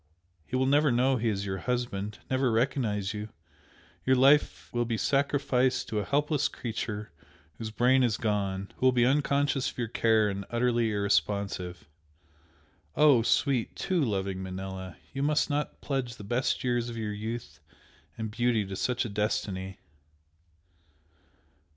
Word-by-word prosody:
He - - -4
will 130 +1 +2
never 145 +1 +4
know 130 +2 +3
he 115 0 0
is 100 -2 -2
your 95 -1 -3
husband 105 -3 -2
never 130 -1 +1
recognise 110 -4 0
you, 105 0 -5 0.7
your 130 - +4
life 140 +3 +3
will 120 0 +1
be 115 -1 -2
sacrificed 135 -1 +1
to 105 - -1
a - - -1
helpless 145 +2 +1
creature 110 -2 -5 0.5
whose 110 - -4
brain 125 +4 +3
is 115 -4 +2
gone 100 -3 -1
who 130 - +3
will - - +6
be 120 -1 +3
unconscious 140 0 +2
of - - -13
your 120 -2 -1
care 110 -2 +3
and 100 -1 -3
utterly 120 -1 +1
irresponsive. 100 -3 -1 1.1
Oh, 145 -6 +6
sweet, 125 +1 +1
TOO 185 -3 0
loving 95 -5 -2
Manella! 95 -1 -6 0.2
you 135 - -3
must 150 +1 +2
not 145 +1 -2
pledge 130 -4 -2
the 105 - -10
best 120 +7 0
years 120 -1 0
of 115 - -6
your 105 -2 -3
youth 110 -7 -6 0.6
and 110 -1 -4
beauty 120 -2 +1
to 95 0 -6
such 125 +5 0
a - - -2
destiny!" 100 -2 -2
115 Hz, 150 wpm, -29 LUFS, 105-130 Hz, 1.1 s, will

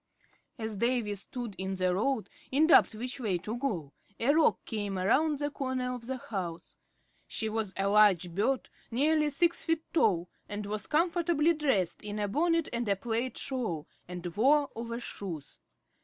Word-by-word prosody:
As 220 -3 -4
Davy 235 -1 +1
stood 225 +3 -6
in 190 0 -2
the 185 -1 +1
road, 225 +4 0 0.2
in 290 +4 +4
doubt 320 -8 +6
which 250 +5 -4
way 205 -7 0
to 210 +6 -5
go, 190 - -3 0.3
a 255 +5 +3
Roc 320 0 +3
came 205 -4 -3
around 285 +11 +2
the 290 +1 -2
corner 255 -2 -2
of 240 -2 -7
the 260 0 -2
house. 185 -8 -5 0.5
She 220 - -2
was 215 -2 -1
a 195 0 +1
large 200 -4 +5
bird, 245 +8 +1 0.2
nearly 300 +5 +2
six 340 +4 +1
feet 325 -1 0
tall, 180 - +3 0.2
and 205 0 -4
was 210 +1 -3
comfortably 335 0 +2
dressed, 265 - 0
in 210 0 -4
a 205 -1 0
bonnet 330 - +2
and 235 -2 -1
a 200 - +3
plaid 235 +5 -2
shawl, 225 - -2 0.2
and 180 0 -7
wore 280 +5 +4
overshoes. 225 - -6
230 Hz, 165 wpm, -30 LUFS, 200-280 Hz, 0.5 s, doubt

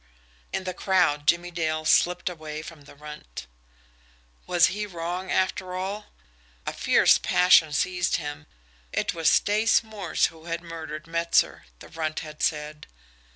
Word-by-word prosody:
In - - -2
the 185 -1 -4
crowd 175 -6 +1
Jimmie 175 +2 +2
Dale 155 -2 -2
slipped 180 +2 +3
away 155 -3 -5
from 160 -3 -12
the 145 - -15
Runt. 150 - -10 1.0
Was 175 -1 +5
he 210 +1 -3
wrong, 175 +1 -5
after 185 -1 -1
all? 195 +3 -4 0.6
A - - -3
fierce - - +4
passion 180 -4 +5
seized 180 +3 0
him. 150 -1 -5 0.4
It - - -1
was 165 -2 +2
Stace 215 +3 +3
Morse 210 -6 -1
who 160 0 -16
had 170 0 -4
murdered 160 -2 -7
Metzer, 170 - +1
the - - -13
Runt 155 -1 -3
had 155 -1 -10
said. 150 -1 -2
165 Hz, 145 wpm, -26 LUFS, 155-180 Hz, 1.0 s, Was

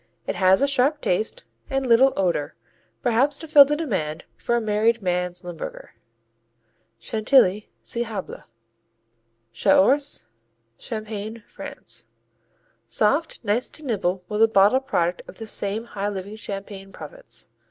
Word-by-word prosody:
It - - -1
has 190 +4 +4
a - - +4
sharp 275 +2 +2
taste 220 - -1 0.3
and 270 0 -1
little 255 +3 +6
odor, 170 -5 0 0.5
perhaps 255 +4 +3
to 320 - -7
fill 295 -2 +9
the 295 +2 0
demand 185 - -2
for 235 - -1
a - - +3
"married 220 +1 +1
man's 180 0 -1
Limburger." 175 -2 -8 1.0
Chantilly 215 - +2
see 235 - -2
Hablé. 210 -4 -6 1.1
Chaource 285 - +3 0.5
Champagne, 215 0 -6
France - - -6 0.8
Soft, 285 +10 +1
nice 225 +4 0
to 310 - -5
nibble 190 -6 -1
with 210 - -3
the 225 - +8
bottled 220 +6 +4
product 175 -4 0
of - - -12
this 225 -2 -7
same 205 +2 -2
high 205 -3 -3
living 200 +1 -6
Champagne 195 -2 -7
Province. - - -9
215 Hz, 130 wpm, -24 LUFS, 195-265 Hz, 1.1 s, fill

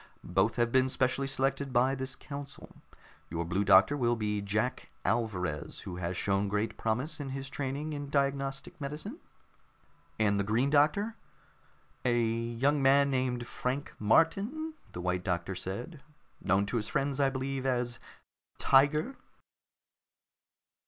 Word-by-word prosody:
Both 95 +5 +2
have 120 -1 +1
been 130 +1 +4
specially 130 +1 +1
selected 135 0 0
by 130 +2 +3
this 130 0 -3
council. 140 -1 -9 0.5
Your 85 +1 -2
Blue 90 +4 0
Doctor 100 +8 +6
will 120 -4 +2
be 105 -2 -1
Jack 105 +5 -1 0.2
Alvarez, 90 -8 -1
who 90 -2 -6
has 90 0 -3
shown 100 0 +1
great 105 +2 -1
promise 125 +9 -1
in 140 -2 -4
his 135 0 -5
training 145 +3 -3
in 145 -1 -5
diagnostic 140 +3 -1
medicine." 155 - -5 1.0
"And 100 -2 +2
the - - +2
Green 115 +7 +1
Doctor?" 155 +10 +3 0.9
"A 120 -1 +2
young 115 +5 +1
man 140 +1 +5
named 125 -2 0
Frank 130 +4 -3
Martin," 200 - +2 0.2
the 90 - -6
White 90 0 -1
Doctor 90 +1 -1
said. 120 - -5 0.4
"Known 95 +3 +3
to 120 - -2
his 105 -1 -2
friends, 140 0 -1
I 135 -1 +4
believe, 135 0 -3
as 120 -2 -1 0.6
'Tiger.'" 150 - +3
130 Hz, 140 wpm, -31 LUFS, 105-140 Hz, 1.0 s, Doctor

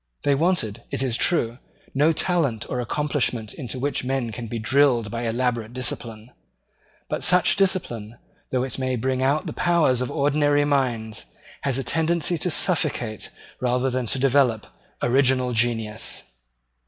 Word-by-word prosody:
They 145 - +3
wanted, 140 - 0
it 135 - 0
is 125 -4 0
true, 120 -6 0 0.3
no 150 +4 +4
talent 155 - 0
or 125 - -1
accomplishment 125 -4 -1
into 130 -2 -5
which 140 +2 -1
men 130 -2 -2
can 115 +2 -6
be 115 - -4
drilled 120 -1 +2
by 115 0 -3
elaborate 120 -1 -1
discipline; 120 -2 -5 0.8
but - - -3
such 180 -2 +6
discipline, 120 - -1 0.3
though 125 -1 0
it 130 0 -3
may 130 -1 0
bring 130 +2 -1
out 140 +3 +1
the - - -5
powers 165 -8 +2
of 125 - -2
ordinary 145 0 +2
minds, 120 -7 -1 0.4
has 135 -2 0
a 135 - -2
tendency 165 +5 0
to 180 - 0
suffocate, 125 - 0 0.3
rather 125 +1 0
than 125 -1 -2
to 130 - 0
develop, 130 -4 +2 0.4
original 130 0 +3
genius. 115 -2 -1
130 Hz, 150 wpm, -23 LUFS, 120-145 Hz, 0.8 s, such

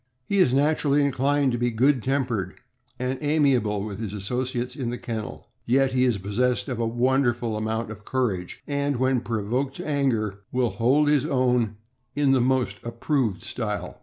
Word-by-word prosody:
He 200 +6 0
is 160 -9 +5
naturally 145 +1 +2
inclined 140 0 +1
to 120 - -2
be 120 0 +1
good 125 +3 +2
tempered 120 -8 -1 0.4
and 130 +1 -3
ami 145 -2 +3
able 105 -5 0
with 105 -1 -6
his 110 -3 -4
associates 125 +4 -3
in 130 -5 -3
the 120 - -3
kennel; 115 -4 -6 0.2
yet 135 +2 +3
fee 130 0 +2
is 120 -5 +2
possessed 115 +8 0
of 125 -3 -3
a 115 - +1
wonderful 120 -1 +1
amount 110 +1 -2
of 105 -1 -10
courage, 105 -9 -2
and 140 0 -1
when 130 -1 +2
provoked 120 +5 -2
to - - -6
anger 115 -9 0
will 125 -2 +1
hold 135 +6 +2
his 145 -2 +3
own 125 -4 +1 0.4
in 145 -2 +3
the 130 -2 +4
most 130 0 +1
approved 120 -3 -1
style. - - -4
125 Hz, 175 wpm, -25 LUFS, 115-135 Hz, 0.4 s, is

